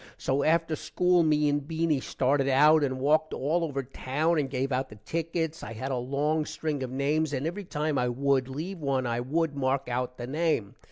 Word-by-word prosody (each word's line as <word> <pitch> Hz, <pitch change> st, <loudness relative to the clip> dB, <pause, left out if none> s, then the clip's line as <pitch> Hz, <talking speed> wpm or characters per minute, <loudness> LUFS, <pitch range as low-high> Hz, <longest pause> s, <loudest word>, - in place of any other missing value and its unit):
so 135 Hz, +2 st, 0 dB
after 165 Hz, 0 st, +2 dB
school 180 Hz, +3 st, +2 dB
me 150 Hz, -2 st, +3 dB
and 145 Hz, -1 st, 0 dB
Beany 160 Hz, -2 st, +1 dB
started 135 Hz, +2 st, 0 dB
out 150 Hz, +3 st, +5 dB
and 130 Hz, -2 st, -1 dB
walked 155 Hz, +3 st, +2 dB
all 160 Hz, +6 st, 0 dB
over 140 Hz, -4 st, -2 dB
town 150 Hz, +5 st, 0 dB
and 140 Hz, -2 st, -1 dB
give 135 Hz, +1 st, -2 dB
out 130 Hz, +1 st, -1 dB
the 105 Hz, -, -11 dB
tickets. 165 Hz, -, -3 dB
i 115 Hz, -, -7 dB
had 130 Hz, +5 st, -4 dB
a -, -, 0 dB
long 145 Hz, +5 st, 0 dB
string 155 Hz, -2 st, -3 dB
of 130 Hz, -, -3 dB
names 145 Hz, +3 st, 0 dB
and 135 Hz, +1 st, -2 dB
every 185 Hz, +5 st, -4 dB
time 150 Hz, -3 st, -1 dB
i 125 Hz, 0 st, +1 dB
wood 135 Hz, +1 st, +1 dB
leave 165 Hz, +8 st, -5 dB
one 135 Hz, -3 st, 0 dB
i 120 Hz, 0 st, -1 dB
wood 150 Hz, +4 st, -1 dB
mark 135 Hz, 0 st, 0 dB
out 125 Hz, +1 st, -2 dB
the 120 Hz, -, -5 dB
name. 150 Hz, -6 st, 0 dB
145 Hz, 210 wpm, -28 LUFS, 130-160 Hz, -, out